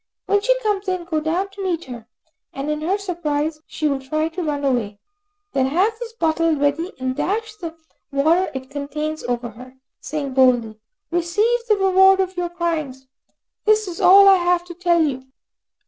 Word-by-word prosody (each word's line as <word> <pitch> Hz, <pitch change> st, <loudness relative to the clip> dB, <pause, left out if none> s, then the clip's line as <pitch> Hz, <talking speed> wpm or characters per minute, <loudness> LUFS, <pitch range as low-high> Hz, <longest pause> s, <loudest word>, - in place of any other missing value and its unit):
When 405 Hz, 0 st, +2 dB
she -, -, +2 dB
comes 410 Hz, -3 st, -1 dB
in, 370 Hz, -2 st, -1 dB
go 330 Hz, -2 st, -1 dB
down 340 Hz, +6 st, -1 dB
to 390 Hz, 0 st, -8 dB
meet 345 Hz, -3 st, -2 dB
her, 235 Hz, -3 st, -9 dB, 0.5 s
and 275 Hz, +2 st, -3 dB
in 300 Hz, 0 st, -3 dB
her 365 Hz, +6 st, 0 dB
surprise, 315 Hz, -5 st, -2 dB
she 310 Hz, -, -2 dB
will 280 Hz, -2 st, 0 dB
try 310 Hz, +4 st, -2 dB
to 345 Hz, +3 st, -5 dB
run 290 Hz, -3 st, -2 dB
away. 230 Hz, -6 st, -1 dB, 0.6 s
Then 265 Hz, -2 st, +2 dB
have 370 Hz, +11 st, +2 dB
this 475 Hz, -1 st, -7 dB
bottle 330 Hz, -4 st, +1 dB
ready, 290 Hz, +5 st, 0 dB
and 255 Hz, 0 st, -2 dB
dash 435 Hz, +7 st, -2 dB
the 335 Hz, -5 st, -7 dB, 0.4 s
water 320 Hz, +7 st, +2 dB
it 260 Hz, +1 st, -7 dB
contains 300 Hz, +2 st, -4 dB
over 240 Hz, 0 st, -2 dB
her, 250 Hz, +4 st, -13 dB, 0.2 s
saying 280 Hz, -2 st, -4 dB
boldly, 245 Hz, -4 st, +3 dB, 0.3 s
"Receive 415 Hz, +8 st, +1 dB
the 425 Hz, -2 st, +3 dB
reward 385 Hz, 0 st, +5 dB
of 375 Hz, 0 st, -1 dB
your 355 Hz, -1 st, -2 dB
crimes." 320 Hz, -7 st, -3 dB, 0.6 s
That 430 Hz, -, +6 dB
is 420 Hz, -4 st, -3 dB
all 390 Hz, +2 st, +8 dB
I 390 Hz, -1 st, +8 dB
have 350 Hz, 0 st, +1 dB
to 350 Hz, -, -9 dB
tell 345 Hz, -1 st, +2 dB
you." 270 Hz, -4 st, -1 dB
330 Hz, 180 wpm, -21 LUFS, 280-375 Hz, 0.6 s, all